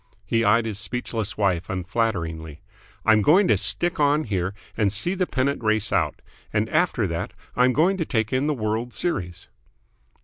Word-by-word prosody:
He 115 Hz, +2 st, +1 dB
eyed 115 Hz, +2 st, +3 dB
his 105 Hz, -3 st, -4 dB
speechless 115 Hz, -1 st, -3 dB
wife 95 Hz, -4 st, 0 dB
unflatteringly. 85 Hz, -5 st, -2 dB, 0.5 s
"I'm 110 Hz, -1 st, +5 dB
going 180 Hz, -, +5 dB
to 105 Hz, -, +5 dB
stick 105 Hz, -, +1 dB
on 145 Hz, +1 st, +3 dB
here 95 Hz, -, -2 dB, 0.2 s
and 100 Hz, -3 st, +1 dB
see 115 Hz, -, +1 dB
the 185 Hz, -2 st, -1 dB
pennant 135 Hz, -1 st, -1 dB
race 110 Hz, 0 st, +1 dB
out. 80 Hz, -6 st, 0 dB, 0.3 s
And -, -, 0 dB
after -, -, +1 dB
that -, -, -4 dB, 0.2 s
I'm 125 Hz, +1 st, +4 dB
going 175 Hz, +8 st, +2 dB
to 165 Hz, -, -1 dB
take 110 Hz, -5 st, -1 dB
in 130 Hz, +3 st, +1 dB
the 150 Hz, -, 0 dB
World's 110 Hz, 0 st, -3 dB
Series." 90 Hz, -, -3 dB
110 Hz, 170 wpm, -24 LUFS, 100-130 Hz, 0.5 s, I'm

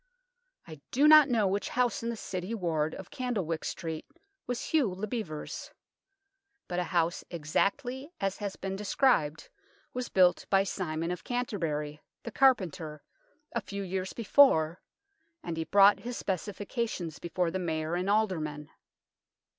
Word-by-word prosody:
I 155 Hz, -3 st, -10 dB
do 285 Hz, +4 st, +4 dB
not 305 Hz, -2 st, +9 dB
know 225 Hz, -4 st, +3 dB
which 200 Hz, +2 st, -1 dB
house 250 Hz, +3 st, +1 dB
in 230 Hz, -, -2 dB
the 235 Hz, -, -2 dB
City 185 Hz, +2 st, -4 dB
ward 160 Hz, -6 st, -1 dB
of -, -, -10 dB
Candlewyck 215 Hz, -, -2 dB
Street 160 Hz, -2 st, -4 dB, 0.4 s
was 245 Hz, -1 st, -2 dB
Hugh 295 Hz, -9 st, +3 dB
le 190 Hz, +3 st, -4 dB
Bevere's. 200 Hz, -9 st, -5 dB, 1.0 s
But 180 Hz, -, -2 dB
a 180 Hz, -, 0 dB
house 170 Hz, -1 st, 0 dB
exactly 245 Hz, -, -1 dB
as 195 Hz, -1 st, -1 dB
has 200 Hz, -2 st, -4 dB
been 195 Hz, 0 st, -4 dB
described 195 Hz, -, +1 dB, 0.4 s
was 250 Hz, 0 st, -3 dB
built 180 Hz, -2 st, +4 dB
by 195 Hz, 0 st, +4 dB
Simon 165 Hz, -3 st, -3 dB
of 180 Hz, -1 st, -5 dB
Canterbury, 160 Hz, -12 st, -2 dB, 0.2 s
the 235 Hz, -, -6 dB
carpenter, 185 Hz, -, +2 dB, 0.5 s
a 235 Hz, -, -1 dB
few 200 Hz, -1 st, -5 dB
years 190 Hz, 0 st, -3 dB
before, 195 Hz, -, +4 dB, 0.6 s
and 170 Hz, -2 st, -4 dB
he 160 Hz, 0 st, -2 dB
brought 200 Hz, +4 st, +6 dB
his 245 Hz, 0 st, -5 dB
specifications 195 Hz, -, -3 dB
before 175 Hz, 0 st, -1 dB
the 190 Hz, -, -2 dB
Mayor 160 Hz, -2 st, -2 dB
and 180 Hz, +2 st, -1 dB
Aldermen. 160 Hz, -9 st, 0 dB
190 Hz, 145 wpm, -30 LUFS, 165-230 Hz, 1.0 s, not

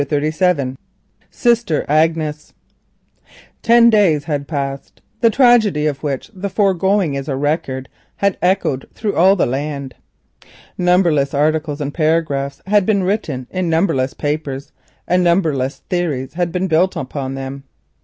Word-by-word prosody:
CHAPTER 145 Hz, +1 st, -1 dB
XXXVII. 155 Hz, -7 st, 0 dB, 0.5 s
SISTER 235 Hz, -, +1 dB
AGNES 155 Hz, 0 st, 0 dB, 1.1 s
Ten 235 Hz, 0 st, +5 dB
days 180 Hz, -9 st, +3 dB
had 145 Hz, -2 st, -3 dB
passed. 140 Hz, -3 st, -5 dB, 0.2 s
The 230 Hz, -, +4 dB
tragedy 225 Hz, -, +3 dB
had 145 Hz, -3 st, -1 dB, 2.4 s
echoed 180 Hz, -8 st, 0 dB
through 210 Hz, -2 st, -2 dB
all 190 Hz, +3 st, +5 dB
the 190 Hz, -, +1 dB
land. 140 Hz, 0 st, -4 dB, 0.8 s
Numberless 175 Hz, -6 st, +2 dB
articles 150 Hz, 0 st, 0 dB
and 145 Hz, 0 st, -3 dB
paragraphs 155 Hz, -4 st, -1 dB
had 205 Hz, -1 st, +2 dB
been 200 Hz, -3 st, +2 dB
written 180 Hz, -10 st, -2 dB
in 185 Hz, -2 st, -2 dB
numberless 160 Hz, -6 st, +1 dB
papers, 145 Hz, -2 st, -4 dB, 0.4 s
and 180 Hz, 0 st, +2 dB
numberless 160 Hz, -7 st, 0 dB
theories 150 Hz, -8 st, -2 dB
had 175 Hz, 0 st, -1 dB
been 180 Hz, +2 st, -1 dB
built 180 Hz, +1 st, +2 dB
upon 135 Hz, 0 st, -4 dB
them. 135 Hz, +1 st, -6 dB
155 Hz, 115 wpm, -18 LUFS, 140-185 Hz, 2.4 s, Ten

